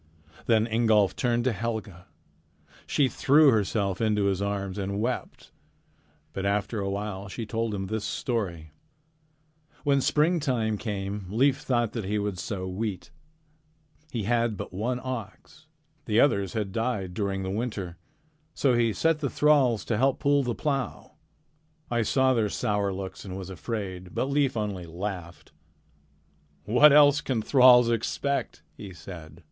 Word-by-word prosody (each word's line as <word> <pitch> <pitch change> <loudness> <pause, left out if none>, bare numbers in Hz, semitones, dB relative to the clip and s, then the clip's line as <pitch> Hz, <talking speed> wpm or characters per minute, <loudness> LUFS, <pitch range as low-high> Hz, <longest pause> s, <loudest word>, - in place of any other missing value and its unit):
Then 110 -2 +4
Ingolf 110 -4 +2
turned 120 -2 0
to 130 - +2
Helga. 110 -4 -5 0.8
She 140 - +2
threw 145 +3 +5
herself 100 -3 0
into 105 -2 +1
his 100 -1 0
arms 100 -1 -3
and 100 +1 -3
wept. 120 +3 -4 0.8
But 95 - -4
after 105 +2 -1
a 100 -1 -2
while 100 0 -4
she 110 +4 -6
told 115 -1 -2
him 95 -1 -3
this 110 +2 -3
story: 90 - -3 1.1
"When 140 -2 +3
springtime 135 - +1
came, 100 -3 -4
Leif 135 +6 +2
thought 120 -6 0
that 115 -5 -4
he 105 +2 -1
would 100 -3 -2
sow 95 0 -4
wheat. 100 +4 -4 1.0
He 115 -6 -3
had 115 0 +1
but - - -7
one 120 +6 -2
ox. 130 +5 -7 0.4
The 110 0 +2
others 100 -10 +2
had 105 -3 -2
died 110 -5 -2
during 95 0 -2
the 95 - -3
winter. 100 -5 -4 0.6
So 135 -3 +2
he 115 -2 +2
set 165 +9 +1
the 140 -3 -1
thralls 135 -9 +3
to 115 - -1
help 135 +2 +2
pull 145 -1 +2
the 120 -3 -2
plow. 135 -6 -3 0.8
I 120 -1 +2
saw 130 +4 +2
their 110 -4 +1
sour 105 -3 -1
looks 95 0 -6
and 95 -2 -7
was 95 -1 -7
afraid, 95 -2 -5
but 135 - -1
Leif 140 -3 +1
only 100 -5 -3
laughed: 90 0 -6 1.1
"'What 125 +8 +6
else 145 0 +6
can 125 -7 -2
thralls 125 -2 +6
expect?' 140 +5 -2
he 100 -2 -9
said. 85 -3 -11
110 Hz, 150 wpm, -27 LUFS, 100-125 Hz, 1.1 s, What